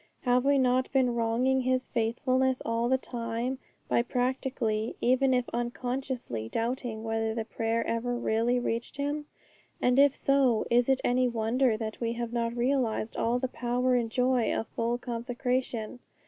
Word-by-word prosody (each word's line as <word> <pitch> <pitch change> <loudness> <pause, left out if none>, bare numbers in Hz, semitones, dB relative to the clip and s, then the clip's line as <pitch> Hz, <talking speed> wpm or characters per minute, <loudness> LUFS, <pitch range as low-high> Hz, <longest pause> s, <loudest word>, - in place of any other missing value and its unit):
Have 250 0 +2
we 280 0 +4
not 255 0 +2
been 260 -3 +2
wronging 235 +3 +1
His 255 0 0
faithfulness 255 +3 +1
all 230 +1 0
this 260 0 +2
time 235 +2 -3 0.3
by - - +3
practically, 245 -3 -1
even 260 +2 +3
if 250 -1 +1
unconsciously, 240 - -3
doubting 230 - -2
whether 225 0 -1
the 225 -1 -2
prayer 230 +1 -1
ever 240 +1 -1
really 240 +1 +1
reached 235 +1 -3
Him? 290 +1 -2 0.5
And 250 +2 +3
if 280 -1 +5
so, 270 -5 +2
is 245 +1 +4
it 265 -1 +3
any 250 +1 +2
wonder 235 +1 +1
that 220 0 -5
we 230 0 0
have 235 0 -4
not 235 0 -1
realized 240 -3 0
all 235 +2 +1
the 260 +1 -1
power 250 +1 0
and 240 -2 +1
joy 250 0 +2
of - - -1
full 235 +1 -1
consecration? 245 -1 -3
245 Hz, 160 wpm, -29 LUFS, 230-255 Hz, 0.5 s, if